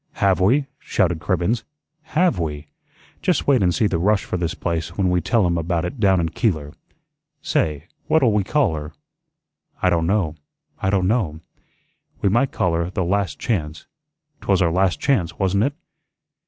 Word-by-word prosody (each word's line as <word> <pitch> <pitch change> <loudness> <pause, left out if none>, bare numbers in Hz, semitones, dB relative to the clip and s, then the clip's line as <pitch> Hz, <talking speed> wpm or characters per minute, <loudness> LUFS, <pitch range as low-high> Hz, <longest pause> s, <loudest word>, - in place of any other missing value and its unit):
"Have 95 -1 +2
we?" 125 +10 +3
shouted - - 0
Cribbens. 110 +6 0 0.5
"HAVE 175 - +3
we? 75 -2 -4 0.5
Just 180 -1 +1
wait 135 -5 +4
and 90 -2 +3
see 110 - +1
the 90 -5 0
rush 100 +3 +2
for - - -4
this 85 -2 -2
place 85 0 -3
when 95 -3 +2
we 90 -1 +2
tell 110 +4 +2
'em 85 -1 +1
about 85 +1 -1
it 100 +8 -6
down 95 -3 +4
in 80 -1 0
Keeler. 80 -6 -1 0.7
Say, 75 0 0 0.2
what'll 130 -8 +3
we 105 -1 +2
call 120 - +1
her?" 75 0 -6 0.9
"I 90 - +2
don' 85 -1 +1
know, 95 -5 +1 0.5
I 95 - +1
don' 95 -2 +2
know." 95 -9 0 0.8
"We 100 - +2
might 120 +7 +2
call 90 - 0
her 85 +1 -1
the 95 -1 -2
'Last 95 -2 0
Chance.' 80 -9 -3 0.6
'Twas 95 -2 +2
our 85 -2 +2
last 90 -2 +1
chance, 110 - 0
wasn't 100 +3 +2
it? 140 - -1
90 Hz, 175 wpm, -22 LUFS, 85-105 Hz, 0.9 s, wait